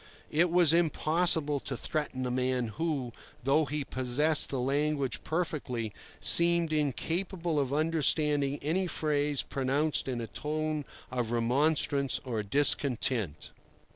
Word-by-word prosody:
It 170 +4 +2
was 170 -2 +4
impossible 160 -2 +3
to 130 -1 -6
threaten 130 -3 -3
a 125 - -2
man 125 -1 -1
who, 135 +1 -3 0.3
though 145 +4 +2
he 145 +1 -3
possessed 135 +5 +3
the 135 - -3
language 140 +1 -1
perfectly, 140 -10 -3 0.3
seemed 170 -1 +3
incapable 165 +3 -1
of 135 -2 -1
understanding 150 -2 +1
any 180 +5 0
phrase 150 -3 0
pronounced 140 +3 0
in 125 -2 -3
a 115 - -4
tone 155 +3 -4 0.3
of 125 -3 -2
remonstrance 140 +3 +1
or 115 -4 -3
discontent. 120 - 0
145 Hz, 120 wpm, -29 LUFS, 130-155 Hz, 0.3 s, was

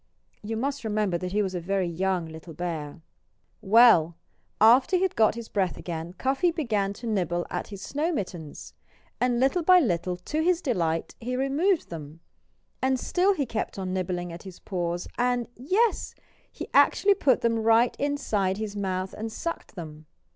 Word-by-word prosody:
You 220 +1 -4
must 275 +3 -2
remember 210 -5 0
that 180 +1 -4
he 210 +2 +1
was 190 -1 -3
a 180 - -2
very 190 +2 -1
young 180 +1 -1
little 160 0 -10
bear. 160 -3 -5 0.6
Well! 195 -6 +6 0.4
After 245 - +6
he 365 - +2
had 380 - 0
got 220 -1 +3
his 235 -1 -7
breath 190 -4 -1
again 170 0 -6
Cuffy 270 - +1
began 220 - -1
to 235 - -10
nibble 175 -6 -1
at - - -3
his 200 -2 -9
snow 305 +5 -1
mittens. 175 - -6 0.5
And 245 -1 +1
little 270 +7 +2
by 365 +2 +6
little 180 - 0
to 300 - -3
his 345 +1 +2
delight 170 - -1
he 250 +2 -3
removed 300 +8 +1
them. 155 0 -8 0.6
And 260 0 +1
still 380 +7 +2
he 285 - -1
kept 220 -4 -4
on 185 -1 -3
nibbling 180 -2 -3
at 170 - -9
his 190 -2 -10
paws, 175 -2 -3
and 245 -1 +1
yes! 385 - 0 0.4
he - - -7
actually 405 0 +5
put 275 - +2
them 230 -1 +1
right 225 +2 +3
inside 220 -10 0
his 215 -1 -4
mouth 190 -2 -2
and 225 +1 -5
sucked 335 0 -5
them. 155 -3 -9
210 Hz, 175 wpm, -26 LUFS, 180-265 Hz, 0.6 s, Well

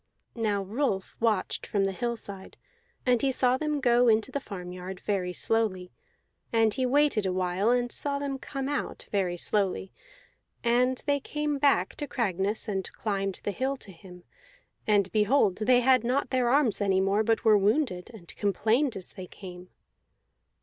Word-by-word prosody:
Now 210 -4 -1
Rolf 200 -2 -2
watched 220 -5 0
from 200 -2 +1
the 195 - +1
hillside, 200 -2 -5 0.5
and 245 -2 +3
he 275 - +2
saw 255 -1 +2
them 300 +1 -1
go 245 -2 +4
into 220 +3 +3
the 280 - -2
farmyard, 180 -4 -7
very 185 -3 -1
slowly; 185 -3 -1 0.6
and 225 -2 +3
he 255 +2 0
waited 275 -6 +2
a - - 0
while, 185 +3 0
and 245 0 +1
saw 280 -1 -1
them 280 -1 -3
come 270 0 -5
out, 290 0 -4
very 185 -4 0
slowly. 195 0 -1 0.7
And 250 +2 +2
they 285 -1 +2
came 295 +1 -2
back 280 0 +3
to 295 - -4
Cragness, 205 -2 -1
and 190 -3 -3
climbed 195 -3 -3
the 205 - -1
hill 265 +5 -2
to 205 - -12
him; 180 0 -14 0.6
and 200 -3 +3
behold, 210 -2 +3
they 245 +3 +4
had 255 -1 +4
not 255 +4 0
their 255 -2 +2
arms 255 -6 +2
any 195 -2 +2
more, 195 +2 +2
but 225 +1 0
were 220 -1 +7
wounded, 205 -2 +1
and 195 -8 -11
complained 220 +6 +1
as 185 - -8
they 185 -2 -8
came. 180 -2 -11
220 Hz, 165 wpm, -28 LUFS, 195-255 Hz, 0.7 s, were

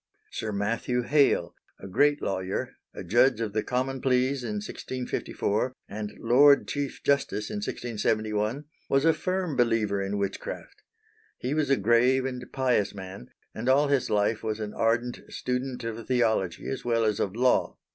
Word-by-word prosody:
Sir 110 - -4
Matthew 115 +4 -1
Hale, 145 +2 +3 0.3
a 95 - -9
great 145 +9 +2
lawyer, 95 0 -2 0.2
a - - -8
judge 120 +1 +3
of 110 -3 -3
the 110 - +1
Common 130 +2 -2
Pleas 130 0 +1
in 110 -3 -3
1654, 125 +1 -3
and 105 0 -5
Lord 140 +5 +5
Chief 145 -2 -4
Justice 140 -6 0
in 210 - -3
1671, 110 - -1 0.2
was 135 +2 +3
a 165 - +6
firm 185 -4 -2
believer 115 -5 +1
in 100 +1 -2
witchcraft. 100 -1 -5 0.6
He 130 +3 -2
was 150 -2 0
a 135 - +4
grave 120 +5 +3
and 125 -1 -4
pious 125 -7 +1
man, 95 -9 -8 0.3
and 120 +4 -2
all 140 +2 +4
his 140 -3 +1
life 105 +1 +1
was 110 -1 -3
an 105 -1 -4
ardent 115 +2 0
student 125 0 -3
of 115 0 -5
theology 110 -8 0
as 135 - -4
well 115 -1 +1
as 105 -2 0
of 95 +1 -1
law. 125 +1 +2
120 Hz, 160 wpm, -27 LUFS, 105-130 Hz, 0.6 s, a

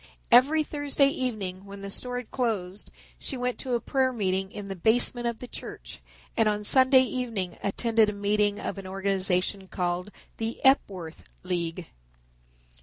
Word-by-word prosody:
Every 285 +6 +6
Thursday 290 -2 +2
evening 210 -9 -3
when 200 0 -10
the 200 0 -6
store 245 +4 -3
had 245 -2 -7
closed 210 -6 -2 0.3
she 270 - -5
went 250 0 -2
to 255 -2 -1
a - - +1
prayer 260 +2 +1
meeting 190 -4 -1
in 205 -2 -7
the 195 - -5
basement 240 +5 +4
of 235 -1 -3
the 250 - -8
church - - -9 0.3
and 225 -1 +3
on 210 0 -2
Sunday 260 +3 +6
evening 230 -8 -3
attended 220 +2 +2
a - - -3
meeting 205 0 +1
of - - -4
an 190 - -8
organization 190 0 -1
called 180 +1 -2 0.3
The 225 +1 -4
Epworth 190 - +1 0.2
League. 175 -1 -3
210 Hz, 160 wpm, -27 LUFS, 190-250 Hz, 0.3 s, Every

